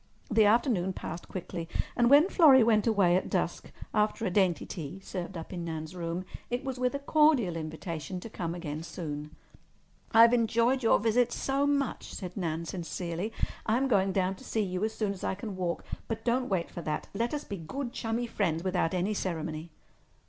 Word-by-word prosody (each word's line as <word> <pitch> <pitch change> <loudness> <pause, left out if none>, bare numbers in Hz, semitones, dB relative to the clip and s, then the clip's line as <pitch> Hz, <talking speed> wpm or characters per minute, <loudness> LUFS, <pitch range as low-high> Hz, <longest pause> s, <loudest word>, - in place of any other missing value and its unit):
The 220 0 +5
afternoon 205 -4 +3
passed 175 - -6
quickly, 170 -2 -6 0.3
and 240 0 +4
when 290 +5 +7
Florrie 290 -10 +7
went 220 -1 +3
away 195 -6 +4
at 185 - 0
dusk, - - -2 0.2
after 215 +1 +1
a 185 - 0
dainty 180 -4 +2
tea 165 +2 -6
served 185 -1 -6
up 165 +3 -7
in 175 -1 -4
Nan's 160 0 -5
room, 170 +1 -3 0.2
it 245 +1 -2
was 265 -2 -4
with 255 +2 +1
a - - +1
cordial 280 - +3
invitation 160 +1 -5
to - - -7
come 170 -6 -4
again 155 -3 -5
soon. 150 -2 -6 0.8
"I've 230 +1 +7
enjoyed 235 +2 +3
your 225 - +5
visit 230 +3 +2
so 275 +3 0
much," 280 -2 -1
said 180 -2 -6
Nan 170 -3 -2
sincerely. 175 +3 -4 0.4
"I'm 245 +5 +2
going 195 -5 +3
down 185 0 +1
to - - -14
see 220 - -1
you 185 0 -2
as 220 0 0
soon 210 -2 -1
as 190 - -11
I - - 0
can 205 0 -6
walk. 180 -2 -2 0.2
But 225 - -4
don't 250 +1 +1
wait 180 -4 -1
for 175 - -6
that. 155 -2 -3
Let 230 +4 -1
us 295 -1 -3
be 200 - -6
good, 240 - -5
chummy 230 +2 -2
friends 175 -8 -1
without 185 -2 0
any 185 +4 0
ceremony." 165 -4 -3
195 Hz, 190 wpm, -30 LUFS, 170-235 Hz, 0.8 s, when